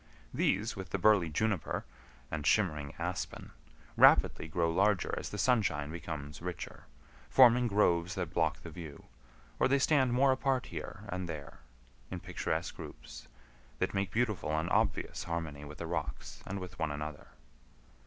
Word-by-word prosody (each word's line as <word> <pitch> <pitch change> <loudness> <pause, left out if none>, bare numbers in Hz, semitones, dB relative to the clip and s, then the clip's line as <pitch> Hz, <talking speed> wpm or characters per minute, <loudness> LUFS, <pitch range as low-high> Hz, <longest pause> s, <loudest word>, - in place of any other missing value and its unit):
These, 110 +5 +1
with 95 -2 -7
the - - -1
burly 95 -3 +4
juniper, 100 +2 -1 0.5
and 75 -1 -3
shimmering 75 -10 +1
aspen, - - -4 0.4
rapidly - - +5
grow 85 +1 +1
larger 100 +2 +2
as - - -4
the 105 - -6
sunshine 105 - +1
becomes 75 -2 -6
richer, 90 -2 -6 0.4
forming 125 -1 +6
groves 95 -4 +2
that 90 -4 -3
block 80 -2 +1
the 80 - -8
view; 80 -3 -9 0.6
or - - +4
they 135 +1 +3
stand 135 -2 +3
more 135 +2 +4
apart 130 -1 +1
here 105 - -7
and 90 -1 -3
there 75 -4 -7 0.5
in - - -5
picturesque - - -3
groups, - - -10 0.5
that - - -1
make 100 -1 0
beautiful 105 -7 0
and 80 +3 -1
obvious 105 -2 0
harmony 80 -4 -4
with 75 +1 -9
the - - -5
rocks - - -4
and 100 - -3
with 90 -2 -8
one 80 -2 0
another. 75 +1 -5
90 Hz, 155 wpm, -32 LUFS, 75-110 Hz, 0.6 s, forming